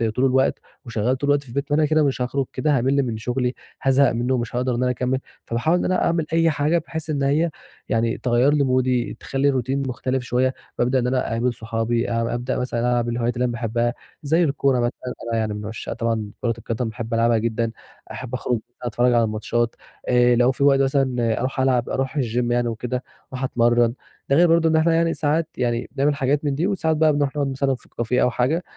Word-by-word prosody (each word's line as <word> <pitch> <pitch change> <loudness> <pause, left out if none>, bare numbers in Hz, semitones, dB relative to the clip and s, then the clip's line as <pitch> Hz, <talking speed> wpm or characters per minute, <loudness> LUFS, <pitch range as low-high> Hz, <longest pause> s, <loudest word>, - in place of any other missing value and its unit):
طول 130 - +2
الوقت 130 0 +2 0.3
وشغَّال 115 +2 0
طول 140 - -3
الوقت 145 0 +3
في 135 - -16
البيت، 140 +4 -3
ما 145 - +3
أنا 155 - +4
كده 155 +1 +3
مش 135 -3 0
هاخرج 135 +2 -1
كده، 150 -2 +1
هامِل 135 +3 +2
من 115 -4 -3
شغلي، 125 +3 -1 0.3
هازهَق 135 0 +4
منه، 125 +3 0
مش 120 -1 -4
هاقدَر 125 0 0
إن 120 - -1
أنا 125 - +2
أكمِّل. 125 +1 -1 0.3
فباحاول 140 +9 +1
إن - - -1
أنا 185 - +1
أعمل 165 -2 +1
أي 165 0 +4
حاجة، 150 +3 +1
بحيث 160 -1 -5
إن 145 -2 0
هي 150 +5 +2 0.4
يعني 115 0 +1
تغيِّر 125 +3 +2
لي 145 -1 +3
مودي، 130 -2 +1
تخلِّي 135 +1 +1
الroutine 135 +1 -1
مختلِف 130 0 -2
شوية. 125 +2 +1 0.3
بأبدأ 125 +2 +2
إن 125 - 0
أنا 130 0 0
أقابِل 120 +2 0
صُحابي، 115 +1 -2
أب 115 0 0
أبدأ 120 +2 -2
مثلًا 125 -1 -2
ألعب 120 0 +1
الهوايات 120 0 -1
اللي 125 - 0
أنا 120 - -1
باحبّها، 120 0 -1 0.3
زي 160 +4 +3
الكورة 140 -4 +1
مثلًا، 120 +1 -3 0.2
أنا 115 - +1
يعني 110 -1 -1
من 105 0 -6
عشاق 110 +1 -5
طبعًا 115 -3 -2
كورة 120 -2 +1
القدَم، 115 +1 -3
بأحب 115 +1 -6
ألعبها 115 0 +3
جدًا، 115 +1 -1 0.4
أحب 130 -1 -7
أخرج، 125 -1 -1 0.2
أتفرَّج 120 +1 +1
على 120 -1 +4
الماتشات. 115 +2 -1 0.3
آآ، 125 0 +4
لو 120 +2 +4
في 135 - -2
وقت 140 -1 +5
مثلًا 130 -4 +1
أرُوح 130 +2 -2
ألعب 130 -2 +2
أرُوح 135 +3 -2
الgym 120 -2 0
يعني 120 0 +1
وكده، 125 +2 -3 0.3
أرُوح 130 0 -4
أتمرَّن. 120 -2 +2 0.4
ده 140 - +4
غير 175 +4 +6
برضه 165 0 +4
إن 160 - +2
إحنا 160 +1 +3
يعني 165 0 +2
ساعات 155 +2 0
يعني 120 -1 -1
بنعمَل 145 +2 +1
حاجات 140 +2 0
من 140 -1 0
دي، 165 +6 0
وساعات 165 -6 0
بقى 155 -1 +4
بنرُوح 145 0 0
نقعُد 145 -2 0
مثلًا 135 0 0
في 120 - -17
كافيه 120 +2 -1
أو - - +4
حاجة، 140 +9 0
125 Hz, 220 wpm, -22 LUFS, 120-140 Hz, 0.4 s, غير